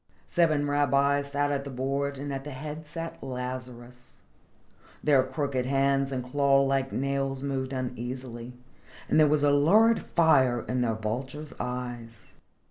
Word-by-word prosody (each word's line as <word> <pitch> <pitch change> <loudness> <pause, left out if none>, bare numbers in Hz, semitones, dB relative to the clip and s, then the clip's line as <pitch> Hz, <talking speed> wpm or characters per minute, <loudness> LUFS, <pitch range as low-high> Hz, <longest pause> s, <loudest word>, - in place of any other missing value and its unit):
Seven 155 -4 +2
rabbis 140 0 +2
sat 145 0 0
at 140 -1 -1
the 140 - -7
board, 140 +2 -2
and 140 +1 -4
at 135 0 -4
the 150 - -7
head 150 +3 -7
sat 165 +1 -6
Lazarus. 125 -1 -7 0.9
Their 145 -3 +5
crooked 130 -1 -2
hands 135 0 +2
and 130 -2 -2
claw 140 +1 +3
like 135 -1 0
nails 135 0 -2
moved 135 -1 -2
uneasily 125 -1 -5 0.5
and - - +3
there 155 - +6
was 145 0 +2
a 145 - +4
lurid 210 +11 +5
fire 130 -8 +3
in 125 0 0
their 115 -2 +1
vulture's 130 +7 -5
eyes. 120 -2 -5
135 Hz, 145 wpm, -28 LUFS, 125-145 Hz, 0.9 s, there